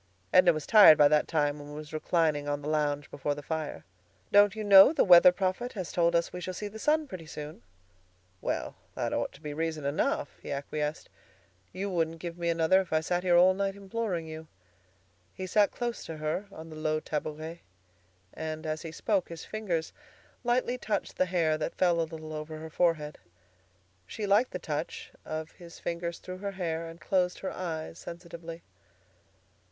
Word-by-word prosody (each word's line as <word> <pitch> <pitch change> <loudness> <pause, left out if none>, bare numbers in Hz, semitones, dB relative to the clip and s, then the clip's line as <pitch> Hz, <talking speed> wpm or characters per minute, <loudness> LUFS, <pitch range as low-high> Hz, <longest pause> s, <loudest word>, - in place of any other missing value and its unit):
Edna 180 -1 +7
was 155 -2 -4
tired 205 -8 +9
by 145 - +7
that 150 0 +3
time, 145 -2 0
and 145 0 -9
was 150 0 -9
reclining 155 -2 +1
on 145 0 -2
the - - -5
lounge 150 -1 -1
before 145 +1 -2
the 145 - -8
fire. 160 0 -4 0.5
"Don't 205 0 +6
you 215 - -4
know 200 +3 +9
the 320 - +3
weather 180 -1 +9
prophet 190 +7 -2
has 185 -5 -5
told 170 -1 +2
us 170 0 +1
we 180 - -5
shall 185 +1 -5
see 210 - -4
the 215 +2 -9
sun 305 +5 +2
pretty 180 - -8
soon?" 150 0 -8 0.8
"Well, - - -3 0.2
that - - -2
ought - - -1
to - - -16
be 150 -2 -5
reason 160 -1 -3
enough," 145 0 -1
he - - -7
acquiesced. 150 +2 -3 0.6
"You 190 +2 -4
wouldn't 165 -2 0
give 170 0 -6
me 170 -1 -2
another 165 +3 +4
if 185 - -9
I 160 - +3
sat 175 +2 -1
here 180 -1 +4
all 185 +2 +6
night 195 0 -2
imploring 200 -3 -3
you." 160 0 -8 0.9
He 185 - -5
sat 205 +2 +3
close 240 -1 -4
to 160 - -6
her 155 +6 -2
on 160 -3 -10
a - - -8
low 155 0 0
tabouret, 155 +2 -5 0.7
and 155 0 -5
as 155 0 -2
he 165 - -7
spoke 195 +2 -1
his 165 -1 -8
fingers 180 -7 -3 0.5
lightly 245 +1 +1
touched 210 -4 -2
the 185 - +2
hair 165 -3 +1
that 155 - -3
fell 175 -2 +3
a 160 - -2
little 155 -1 -8
over 155 +1 -6
her 160 +1 -8
forehead. 155 -3 0 0.9
She 215 - -4
liked 210 +5 +3
the - - -4
touch 155 -1 -5
of 155 0 -5
his 170 -1 -13
fingers 170 0 -4
through 185 0 -8
her 200 0 -4
hair, 165 -3 -3
and 165 +1 -10
closed 180 +2 0
her 190 - -3
eyes 165 -3 -5
sensitively. 170 -1 -9
165 Hz, 190 wpm, -29 LUFS, 155-185 Hz, 0.9 s, tired